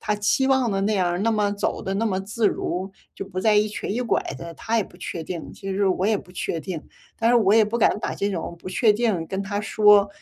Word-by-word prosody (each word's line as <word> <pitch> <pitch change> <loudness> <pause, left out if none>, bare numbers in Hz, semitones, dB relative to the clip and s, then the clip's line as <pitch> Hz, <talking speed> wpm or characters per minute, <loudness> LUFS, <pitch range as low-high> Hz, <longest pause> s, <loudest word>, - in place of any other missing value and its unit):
他 210 - 0
期 210 +6 +2
望 265 -3 +2
的 195 -1 0
那 210 +2 +1
样， 180 -1 0
那 230 - +2
么 210 -2 +1
走 205 0 -2
得 190 - -3
那 225 +3 0
么 190 -3 0
自 210 +2 0
如， 185 +1 -3 0.2
就 - - -6
不 185 -1 -6
再 215 +3 +3
一 210 +1 +3
瘸 210 - -5
一 235 - -1
拐 245 - +1 0.2
的， 170 +2 -8
他 230 +8 -1
也 215 - +1
不 175 - -17
确 175 -2 -5
定。 170 -1 -6
其 195 - -7
实 200 0 +1
我 185 +1 +1
也 220 - +3
不 180 - -11
确 175 - -3
定， 160 +1 -5 0.4
但 225 - +2
是 245 - +5
我 210 -4 +4
也 220 0 +6
不 215 +3 -2
敢 235 - +3
把 - - -3
这 200 +1 -1
种 170 -2 -4
不 - - -15
确 220 +4 +3
定 210 -7 0
跟 190 +3 -3
他 205 +1 -3
说， 210 -1 +5
205 Hz, 290 characters per minute, -23 LUFS, 185-220 Hz, 0.4 s, 也